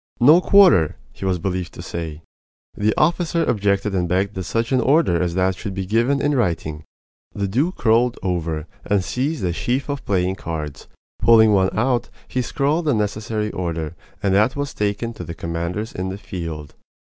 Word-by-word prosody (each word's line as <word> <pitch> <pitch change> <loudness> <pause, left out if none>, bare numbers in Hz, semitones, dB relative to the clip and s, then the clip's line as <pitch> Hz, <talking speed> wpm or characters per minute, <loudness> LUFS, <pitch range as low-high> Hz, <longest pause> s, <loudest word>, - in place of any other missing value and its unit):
"No 150 +8 +7
quarter!" 180 - +5 0.2
he - - -7
was 95 -1 +1
believed 90 0 -3
to - - -8
say. 80 -2 -6 0.5
The 105 +1 +1
officer 170 +1 +2
objected 100 -1 +1
and 90 -2 0
begged 95 +3 +1
that 95 -2 -5
such 115 +7 -1
an 130 -1 +3
order 135 - +3
as 85 -1 -1
that 95 0 +2
should 95 0 -6
be 95 -1 -3
given 120 +8 +2
in 145 +1 +1
writing. 80 - -1 0.5
The 100 -1 -1
duke 135 - -1
rolled 115 +2 +3
over 85 -4 -2 0.2
and 100 -2 +1
seized 135 - -2
a 85 - 0
sheaf 130 - -2
of 140 -1 -3
playing 95 -1 0
cards. 75 -3 -6 0.3
Pulling 110 -2 +6
one 95 -1 +3
out, 120 +1 +1 0.2
he 130 - -1
scrawled 145 +6 0
the 145 -5 +2
necessary 105 0 -2
order, 85 -2 -3 0.3
and 100 -2 +2
that 105 +6 +3
was 145 -1 -3
taken 105 +3 -2
to - - -8
the 85 - -7
commanders 85 +7 -4
in 95 +1 -3
the 95 - -5
field. 85 -7 -6
100 Hz, 180 wpm, -21 LUFS, 90-125 Hz, 0.5 s, No